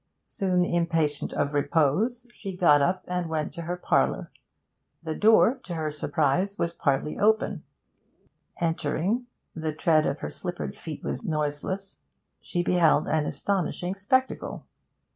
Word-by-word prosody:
Soon 180 -2 +1
impatient 165 -4 0
of 145 0 -1
repose, 165 - +1
she 195 -5 -7
got 150 -5 +5
up 180 +6 +1
and 180 -2 -2
went 155 -1 -2
to 170 - -6
her 175 +2 -3
parlour. - - +1 0.7
The 160 -1 -3
door, 225 - +5
to 175 - -5
her 155 -2 -2
surprise, 150 +7 0
was 170 0 -1
partly 140 -1 0
open; 220 +1 +2 1.0
entering 170 - 0 0.3
the 160 -1 -2
tread 155 0 +3
of 140 - -1
her - - -3
slippered 175 -1 -5
feet 155 -3 -8
was - - -3
noiseless 155 +3 -3 0.4
she 175 - -2
beheld 175 -3 +3
an 155 -1 +1
astonishing 185 -2 -1
spectacle. 260 +7 -1
170 Hz, 135 wpm, -27 LUFS, 155-190 Hz, 1.0 s, got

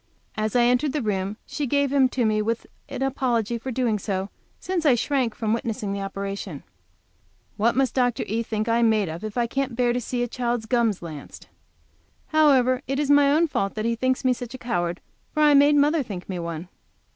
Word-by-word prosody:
As 215 +1 -2
I 245 - +5
entered 250 +4 +2
the 300 - -1
room 200 -1 -2
she 290 -2 -3
gave 280 +1 +1
him 270 -2 +4
to 250 -2 0
me 215 -1 +2
with 230 +2 -2 0.2
an - - -3
apology 240 -4 0
for 260 - -6
doing 235 -4 0
so, 195 0 -3 0.3
since 365 -3 -2
I 280 -6 +5
shrank 250 -2 0
from 220 -1 -1
witnessing 225 -4 -2
the 200 - -3
operation. 195 -5 -5 0.9
What 230 +3 +2
must 265 -2 +1
Dr. 245 -3 +1
E. 225 +3 -1
think 215 -1 -3
I 230 +1 +2
am 230 -1 +4
made 210 -5 +1
of 165 +4 -7
if 215 +2 -5
I 240 - +2
can't 265 +1 -2
bear 240 0 +2
to 245 - -1
see 245 +1 -2
a - - -1
child's 240 -1 -2
gums 230 -6 +1
lanced? 155 -4 -9 0.8
However, 265 -5 +4
it 270 - -1
is 290 -1 +1
my 285 -1 +5
own 315 +3 +4
fault 195 -9 -2
that 215 0 -2
he 230 0 +1
thinks 260 +2 0
me 255 - +4
such 245 0 -7
a - - -6
coward, 175 -8 -2 0.3
for 305 - +3
I 295 -1 +6
made 285 +1 +6
mother 295 +2 +3
think 195 -8 -7
me 185 -2 -4
one. 170 +1 -5
235 Hz, 215 wpm, -24 LUFS, 215-265 Hz, 0.9 s, I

